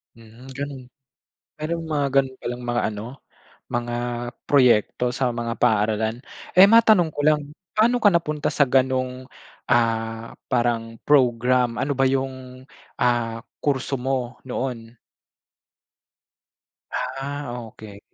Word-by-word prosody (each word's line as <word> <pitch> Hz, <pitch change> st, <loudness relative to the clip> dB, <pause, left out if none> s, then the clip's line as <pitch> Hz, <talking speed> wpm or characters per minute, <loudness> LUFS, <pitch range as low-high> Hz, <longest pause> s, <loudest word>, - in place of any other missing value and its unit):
Hmm, 115 Hz, +3 st, -14 dB
gano'n. 140 Hz, -2 st, -5 dB, 0.7 s
Mayro'ng 165 Hz, +1 st, -4 dB
mga 150 Hz, -2 st, 0 dB
gano'n 130 Hz, -1 st, -2 dB
palang 120 Hz, 0 st, -6 dB
mga 120 Hz, 0 st, 0 dB
ano, 105 Hz, 0 st, -6 dB, 0.7 s
mga 120 Hz, 0 st, -2 dB, 0.5 s
proyekto 125 Hz, -2 st, +3 dB
sa 130 Hz, -2 st, 0 dB
mga 115 Hz, -1 st, -3 dB
paaralan. 110 Hz, +2 st, +1 dB, 0.3 s
Eh, 185 Hz, +2 st, +8 dB
matanong 220 Hz, -5 st, +6 dB
ko -, -, -6 dB
lang, 150 Hz, 0 st, +4 dB, 0.3 s
paano 235 Hz, +2 st, +2 dB
ka 205 Hz, -, +7 dB
napunta 155 Hz, -3 st, 0 dB
sa 140 Hz, -, +3 dB
gano'ng 130 Hz, 0 st, +1 dB, 0.5 s
ah, 115 Hz, -1 st, 0 dB, 0.2 s
parang 115 Hz, -2 st, 0 dB
program, 125 Hz, -3 st, +3 dB
ano 140 Hz, +1 st, -1 dB
ba 135 Hz, -, +1 dB
'yong 130 Hz, -1 st, -2 dB, 0.3 s
ah, 120 Hz, -2 st, +1 dB, 0.2 s
kurso 135 Hz, -1 st, 0 dB
mo 125 Hz, -1 st, -2 dB
noon? 125 Hz, -3 st, -5 dB, 1.9 s
Ah, 135 Hz, +1 st, -4 dB, 0.2 s
okey. 100 Hz, -2 st, -12 dB
125 Hz, 110 wpm, -23 LUFS, 120-140 Hz, 1.9 s, Eh